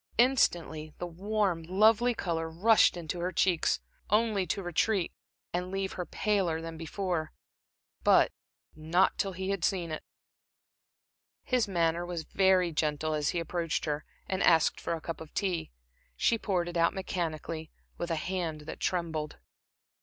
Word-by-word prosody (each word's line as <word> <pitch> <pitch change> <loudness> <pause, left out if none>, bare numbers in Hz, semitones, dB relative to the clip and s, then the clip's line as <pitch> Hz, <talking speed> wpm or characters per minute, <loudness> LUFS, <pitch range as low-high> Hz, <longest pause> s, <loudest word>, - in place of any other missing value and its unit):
Instantly 170 - +2
the - - -4
warm, 190 0 -1
lovely 215 +7 +4
color 165 -4 -2
rushed 195 +4 +4
into 175 +1 -4
her 180 +2 -1
cheeks, 175 -1 +2 0.3
only 210 -3 +2
to 195 - -2
retreat, 175 +2 +1 0.4
and 180 +1 -1
leave 195 0 -2
her 180 - -4
paler 190 -6 0
than 165 0 -6
before 165 0 -3 0.7
but - - +5 0.4
not 160 +5 +2
till 195 -2 0
he 190 +2 -3
had 195 -3 -2
seen 175 -4 0
it. 155 - -4 1.4
His 250 -4 +1
manner 170 -2 +1
was 175 -2 -4
very 185 -1 +3
gentle 155 0 0
as 150 -2 0
he 175 - 0
approached 165 -1 -2
her 150 -1 -2 0.2
and 190 0 -1
asked 165 -2 +4
for 170 - -1
a 160 - -7
cup 165 0 -5
of 160 - -11
tea. 185 -5 -1 0.5
She 230 - +2
poured 180 -5 0
it 175 0 -3
out 170 +3 +3
mechanically, 165 -4 -3 0.3
with 175 - -3
a 165 - +1
hand 165 -2 -3
that 150 - -8
trembled. 160 -4 -2
175 Hz, 155 wpm, -30 LUFS, 160-190 Hz, 1.4 s, but